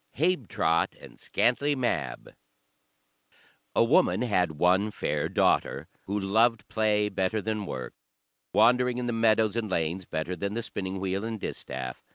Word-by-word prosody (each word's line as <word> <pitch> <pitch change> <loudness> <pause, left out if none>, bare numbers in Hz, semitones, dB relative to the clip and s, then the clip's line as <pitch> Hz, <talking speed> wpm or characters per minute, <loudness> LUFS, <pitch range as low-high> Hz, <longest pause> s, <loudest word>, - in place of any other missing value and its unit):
Habetrot 125 - +1
and - - -14
Scantlie 145 +4 +1
Mab 125 -2 -2 1.4
A - - +5
woman 130 +4 +3
had 90 -8 +1
one 90 +7 +2
fair - - -2
daughter, - - +1 0.2
who 100 +2 -1
loved 110 +3 +2
play 105 -1 +1
better 95 +1 -1
than 105 -1 -3
work, 65 - -5 0.6
wandering 125 +4 +4
in 125 - -2
the 120 - -1
meadows 110 -2 +3
and 115 -3 -2
lanes 85 +1 -1
better 80 +3 -3
than 100 +4 -3
the 115 - -2
spinning 95 -2 -4
wheel 95 +1 -2
and 110 -1 -4
distaff. 65 -8 -6
105 Hz, 145 wpm, -27 LUFS, 95-115 Hz, 1.4 s, A